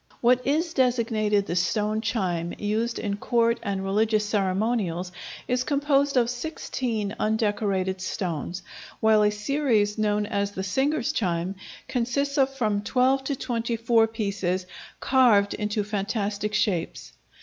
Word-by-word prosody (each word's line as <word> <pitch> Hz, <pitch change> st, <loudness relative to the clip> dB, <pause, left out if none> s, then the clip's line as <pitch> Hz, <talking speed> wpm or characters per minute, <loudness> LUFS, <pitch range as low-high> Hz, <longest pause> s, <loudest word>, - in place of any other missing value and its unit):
What 250 Hz, +1 st, +3 dB
is 320 Hz, +4 st, +1 dB
designated 225 Hz, -6 st, +1 dB
the 175 Hz, -, -3 dB
"stone 210 Hz, +4 st, 0 dB
chime" 180 Hz, -7 st, -1 dB
used 220 Hz, +3 st, -1 dB
in 200 Hz, -2 st, -2 dB
court 235 Hz, +1 st, +1 dB
and 195 Hz, -3 st, -2 dB
religious 210 Hz, +2 st, +1 dB
ceremonials, 195 Hz, -3 st, 0 dB, 0.4 s
is 250 Hz, 0 st, +1 dB
composed 280 Hz, -1 st, +1 dB
of 240 Hz, -2 st, +4 dB
16 240 Hz, -5 st, -3 dB
undecorated 205 Hz, -4 st, 0 dB
stones, 180 Hz, -1 st, -3 dB, 0.4 s
while 220 Hz, -1 st, +4 dB
a 210 Hz, -, +4 dB
series 210 Hz, -1 st, 0 dB
known 210 Hz, -1 st, +1 dB
as 200 Hz, 0 st, -2 dB
the 190 Hz, -, -4 dB
singers' 280 Hz, +10 st, 0 dB
chime 180 Hz, -, -1 dB, 0.3 s
consists 280 Hz, +4 st, -1 dB
of 265 Hz, 0 st, +4 dB
from 215 Hz, -6 st, 0 dB
12 260 Hz, +5 st, +2 dB
to 280 Hz, -, -1 dB
24 230 Hz, -2 st, +1 dB
pieces 200 Hz, -5 st, -2 dB, 0.3 s
carved 235 Hz, -7 st, +4 dB
into 210 Hz, 0 st, -1 dB
fantastic 205 Hz, 0 st, -2 dB
shapes. 180 Hz, -6 st, -1 dB
215 Hz, 125 wpm, -25 LUFS, 200-245 Hz, 0.4 s, of